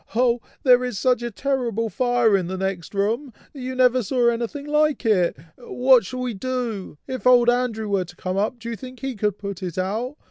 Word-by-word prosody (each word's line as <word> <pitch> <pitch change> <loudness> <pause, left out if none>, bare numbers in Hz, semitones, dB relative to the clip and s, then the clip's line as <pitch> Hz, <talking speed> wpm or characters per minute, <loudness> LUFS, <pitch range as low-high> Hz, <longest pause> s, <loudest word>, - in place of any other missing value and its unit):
Oh! 240 0 +2 0.2
there 250 -2 +6
is 250 -5 -3
such 250 0 +2
a 240 - -3
terrible 235 -2 -1
fire 245 -2 +2
in 185 -3 0
the 190 +1 -4
next 190 -1 -4
room! 225 +8 0 0.2
you 260 -2 -5
never 255 0 +4
saw 240 +2 +2
anything 235 +5 -3
like 300 -2 +1
it! 185 -9 +2 0.2
what 250 -1 +3
shall 255 +5 -5
we 250 -2 -2
do? 230 -6 -4
If 260 -1 -3
old 240 -1 +6
Andrew 240 -3 -1
were 195 -3 0
to 175 +1 -14
come 185 0 -4
up, 210 +5 0
do 235 0 -6
you - - -3
think 255 +1 -11
he 270 -2 -3
could 210 -1 -1
put 200 -2 -6
it 180 -2 -5
out? 220 +9 -2
240 Hz, 210 wpm, -23 LUFS, 200-255 Hz, 0.2 s, there